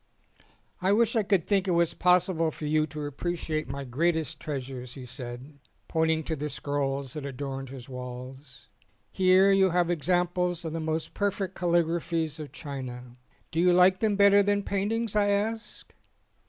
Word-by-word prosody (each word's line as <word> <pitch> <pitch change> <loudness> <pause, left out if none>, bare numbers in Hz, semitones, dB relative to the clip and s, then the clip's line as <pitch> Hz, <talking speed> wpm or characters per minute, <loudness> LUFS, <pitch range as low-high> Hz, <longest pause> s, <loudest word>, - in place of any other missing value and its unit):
"I 190 +2 +3
wish 230 +1 +2
I 225 - +4
could 195 -4 +1
think 195 -2 +2
it 175 -2 +2
was 170 -1 +3
possible 180 -2 +3
for 155 - -7
you 155 +1 +2
to 150 0 -6
appreciate 155 0 -3
my 140 +1 -4
greatest 160 +4 -1
treasures," 130 -4 -6
he 130 -3 -8
said, 125 +3 -8 0.3
pointing 160 -1 +1
to 160 - -2
the 150 +1 -4
scrolls 140 -2 -2
that 150 - -6
adorned 135 -1 -5
his 130 -2 -9
walls. 125 +2 -9 0.4
"Here 190 +1 +5
you 195 -1 +4
have 175 0 +1
examples 175 +1 0
of 160 - -4
the 165 - -2
most 160 0 -3
perfect 200 -2 -1
calligraphies 170 -2 0
of 150 -2 -7
China." 125 -4 -7 0.4
"Do 160 - -1
you 180 +1 +5
like 180 +1 +5
them 215 -2 +1
better 200 0 +6
than 205 0 +1
paintings?" 210 +3 -1
I 205 -1 +3
asked. 220 +3 -2
160 Hz, 165 wpm, -28 LUFS, 140-185 Hz, 0.4 s, better